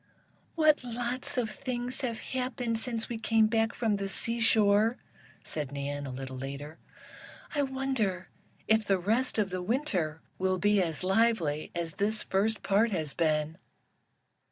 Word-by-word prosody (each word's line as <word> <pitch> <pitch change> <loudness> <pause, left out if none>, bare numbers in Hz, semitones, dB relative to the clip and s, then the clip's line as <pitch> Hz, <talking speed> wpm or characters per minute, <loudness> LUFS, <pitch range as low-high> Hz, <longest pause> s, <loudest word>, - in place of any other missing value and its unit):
"What 310 -4 +4
lots 245 +1 -3
of 230 -3 0
things 250 0 -3
have 235 -4 -3
happened 250 -3 -2
since 230 -1 -2
we 235 -2 -4
came 225 0 +3
back 225 +1 +2
from 220 -4 +1
the 195 0 -3
seashore," 225 0 +3 0.5
said 150 -3 -3
Nan, 140 -1 -4
little 130 0 -6
later. 140 +4 -6 0.7
"I 290 - +1
wonder 265 -9 -1 0.4
if 220 0 +4
the 195 -2 +2
rest 225 +9 +1
of 205 -3 +1
the 185 0 -2
Winter 180 - -1 0.2
will 185 0 +1
be 205 +1 +3
as 165 -1 -2
lively 190 -7 +2
as 170 -2 -2
this 215 +2 0
first 210 +3 0
part 205 +4 +3
has 160 -8 -2
been?" 155 0 0
215 Hz, 145 wpm, -30 LUFS, 170-235 Hz, 0.7 s, What